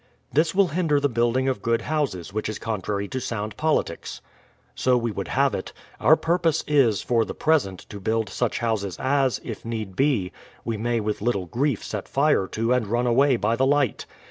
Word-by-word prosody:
This 155 +4 +2
will 195 -2 +4
hinder 155 -2 +1
the 145 - +2
building 120 +2 +1
of 130 -7 -1
good 115 +1 0
houses, 135 - -2
which 110 0 -2
is 110 - -4
contrary 100 -2 -3
to 130 - -3
sound 110 -3 -4
politics: 155 - -1 0.3
— - - -36
So 125 -1 +2
we 120 -1 -1
would - - -4
have - - +2
it. - - -5 0.3
Our 145 +8 +6
purpose 165 -1 +1
is, 130 -9 +3
for 115 -2 +2
the - - -6
present, 140 - +1
to 105 - -8
build 110 +2 0
such 110 +4 -1
houses 110 -5 -2
as, 135 -1 +1
if - - -7
need 110 -5 -5
be, 130 -10 +1 0.3
we 115 - -1
may 115 +1 -1
with 105 -1 -2
little 105 -5 0
grief 125 - -1
set 105 -2 -5
fire 140 -8 +2
to 115 +5 0
and 125 -4 0
run 120 +4 0
away 130 +3 +4
by 115 +1 +1
the 130 +3 +2
light. 145 -4 +1
120 Hz, 200 wpm, -24 LUFS, 105-140 Hz, 0.3 s, Our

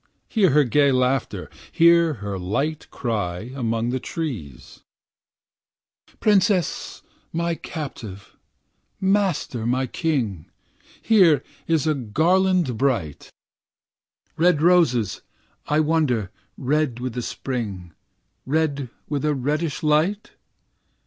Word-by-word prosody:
Hear 205 -5 +3
her 150 +1 +5
gay 140 +2 +3
laughter, 130 +1 0 0.2
hear 170 -1 +5
her 100 -2 -3
light 140 +12 -2
cry 105 -2 -3
Among 115 -2 -1
the 130 - -1
trees. 115 - -6 1.4
"Princess, 200 -4 +1 0.3
my 170 +1 -1
captive." 115 - -8 0.6
"Master, 190 - 0
my 130 +2 +1
king." 125 - -2 0.6
"Here 175 - +5 0.2
is 160 -2 +1
a 155 - +2
garland 160 - +1
bright." 115 - -1 1.1
"Red 170 -2 +4
roses, 135 - +3 0.5
I 150 - +2
wonder, 145 -10 +1 0.3
red 140 -2 0
with 125 -1 -4
the 125 - -3
Spring, 105 -9 -5 0.5
Red 145 -2 -1 0.2
with 145 -1 -2
a 150 -1 +1
reddish 150 +5 -2
light?" 155 +8 +1
140 Hz, 100 wpm, -23 LUFS, 120-165 Hz, 1.4 s, her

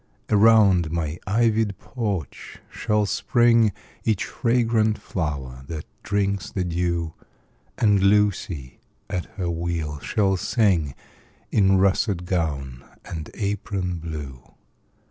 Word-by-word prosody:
Around 100 -6 +5
my 80 0 -2
ivy'd 110 -1 +2
porch 105 - -4
shall 105 -1 0
spring 115 +1 +3 0.3
Each 110 -4 +1
fragrant 115 -3 +1
flower 70 -10 -4
that 80 -1 -5 0.2
drinks 100 -1 -1
the 95 - -2
dew; 85 -2 -1 0.6
And 105 -3 +3
Lucy, 100 - +1 0.3
at 90 - -2
her 90 -3 -1
wheel, 80 -3 -3
shall 95 +3 +1
sing 95 - +1 0.6
In 95 -2 +4
russet 95 -1 +2
gown 75 -8 -2 0.2
and 80 -3 -6
apron 100 -4 -2
blue. 75 -6 -8
95 Hz, 105 wpm, -24 LUFS, 80-105 Hz, 0.6 s, Around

